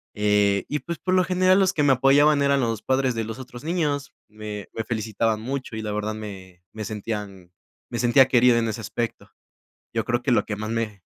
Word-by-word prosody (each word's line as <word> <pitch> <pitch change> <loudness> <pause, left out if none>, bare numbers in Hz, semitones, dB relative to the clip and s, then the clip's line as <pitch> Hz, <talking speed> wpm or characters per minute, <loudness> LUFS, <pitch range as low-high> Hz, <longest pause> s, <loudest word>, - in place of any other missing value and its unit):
Eh, 105 -1 +2
y, 150 - -2
pues, 170 +1 -5
por 185 - -1
lo 185 0 +4
general, 185 +1 +3
los 190 -1 +3
que 150 - +1
me 140 -2 +5
apoyaban 140 +3 +4
eran 140 0 +3
los 115 -3 -1
padres 130 -1 +1
de 115 - -1
los 110 +3 -6
otros 125 -1 -10
niños, 150 -4 -1
me 105 -1 -7
me 115 - -3
felicitaban 110 -1 -1
mucho, 130 0 -4
y 110 - -4
la 105 - -4
verdad, 105 +1 -2
me 95 -4 -10
me 110 -1 -5
sentían 105 -4 -6 0.4
me 120 - -4
sentía 125 +2 +5
querido 125 -2 +4
en 115 -1 +1
ese 110 +1 -4
aspecto. 115 +2 -4 0.6
Yo - - 0
creo 120 +1 0
que 130 - 0
lo - - +3
que 105 - -3
más 110 +1 -5
me 110 -4 -3
115 Hz, 215 wpm, -24 LUFS, 105-135 Hz, 0.6 s, me